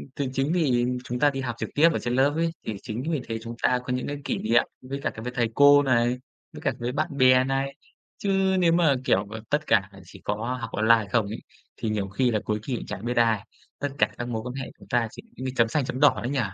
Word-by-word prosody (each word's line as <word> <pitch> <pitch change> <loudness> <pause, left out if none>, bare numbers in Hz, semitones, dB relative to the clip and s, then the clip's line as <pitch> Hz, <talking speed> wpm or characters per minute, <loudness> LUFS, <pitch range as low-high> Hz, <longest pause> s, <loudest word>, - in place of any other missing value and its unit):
thì 140 -2 -2
chính 135 +5 0
vì 130 -8 +2 0.2
chúng 125 0 -4
ta 145 - +5
đi 135 -1 -4
học 125 -3 -3
trực - - -4
tiếp 160 +3 +6
ở - - -1
trên 120 0 -2
lớp 140 +2 +3
ấy, 165 0 +1
thì 110 - -2
chính 115 +4 -5
vì 150 -5 0
thế 115 -1 -3
chúng 115 0 -7
ta 125 - +3
có 125 - -2
những 125 - -2
cái 145 0 -3
kỷ - - -1
niệm 115 +2 +3 0.2
với 135 +2 -5
cả - - 0
với 125 - -4
thầy 120 -3 +1
cô 145 0 +7
này, 120 -1 +2 0.4
với - - -9
cả 135 - +1
với 120 +1 -2
bạn 145 0 -2
bè 130 0 +6
này. 135 +1 -1 0.4
Chứ 200 - -3 0.3
nếu 170 -2 +4
mà, 165 -5 +4
kiểu, 95 - +2
ờ, 110 0 -7
tất 150 +1 0
cả 100 -3 +3 0.2
chỉ - - -14
có 115 +5 -2
học 115 - -4
online 110 0 +3
không 115 -3 +2
ấy, 110 - -5 0.4
thì 110 - -2
nhiều 105 -2 -1
khi 125 +4 +1
là 105 - +1
cuối 105 0 -1
kỳ 130 -1 -2
cũng - - -5
chẳng 100 +4 -6
biết 120 0 -2
ai, 115 -2 +3 0.3
tất 145 - -1
cả - - +3
các 120 - -4
mối 110 -2 -3
quan 125 - -5
hệ 135 -1 -5
của - - -14
ta 120 -2 +2
chỉ - - -10 0.2
giống 130 - -5
như 130 - -1
chấm 115 -2 +4
xanh 135 +3 0
chấm 130 - -4
đỏ 145 - +5
đấy 120 - -2
nhỉ? 140 - 0
125 Hz, 275 wpm, -26 LUFS, 115-140 Hz, 0.4 s, cô